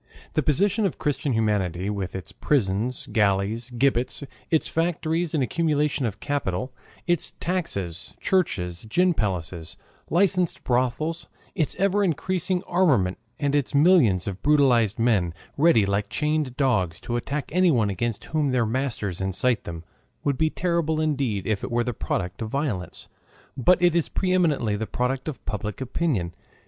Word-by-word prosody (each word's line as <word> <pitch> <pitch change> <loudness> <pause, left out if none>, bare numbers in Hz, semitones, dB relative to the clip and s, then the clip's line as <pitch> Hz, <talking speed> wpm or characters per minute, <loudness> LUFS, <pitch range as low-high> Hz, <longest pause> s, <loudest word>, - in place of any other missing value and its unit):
The 155 - +2
position 200 - +2
of 180 - -6
Christian 145 -2 -1
humanity 100 -5 0
with 100 -3 -3
its 95 -4 -6
prisons, 120 -2 0
galleys, 105 +3 +1
gibbets, 125 +2 0 0.3
its 160 - +2
factories 165 0 0
and 145 - +2
accumulation 150 -2 +1
of 105 - -6
capital, 130 -4 -2 0.3
its 175 -3 0
taxes, 100 - -3
churches, 90 - 0
gin 180 +8 +3
palaces, 90 - -3 0.3
licensed 180 0 +2
brothels, 130 +7 0 0.3
its 155 -6 -1
ever 200 +2 +2
increasing 180 +1 0
armament 135 - +2 0.2
and 145 -1 0
its 145 -1 0
millions 140 - +5
of 100 -1 -4
brutalized 130 -8 +3
men, 105 -8 +2 0.2
ready, 140 -9 +4
like 100 +1 -1
chained 150 -4 -1
dogs, 95 - +1
to 120 - -3
attack 140 +4 -3
anyone 155 - +3
against 115 +2 -3
whom 155 -3 0
their 125 -3 +2
master 115 -3 -1
incites 95 +6 0
them, 85 -1 -6 0.4
would 140 -2 +1
be 160 +4 +2
terrible 165 -2 0
indeed 135 -11 0
if 105 -2 -1
it - - -3
were 120 0 +1
the 125 0 -2
product 90 -2 -3
of 110 - -3
violence, 110 - -3 0.5
but 180 +9 +4
it 175 -1 +4
is 170 -2 +1
pre 185 -1 -1
eminently 150 - +2
the 110 +1 -3
product 130 +2 -2
of 150 -5 -6
public 105 -1 -4
opinion. 130 - -1
130 Hz, 150 wpm, -25 LUFS, 105-160 Hz, 0.5 s, millions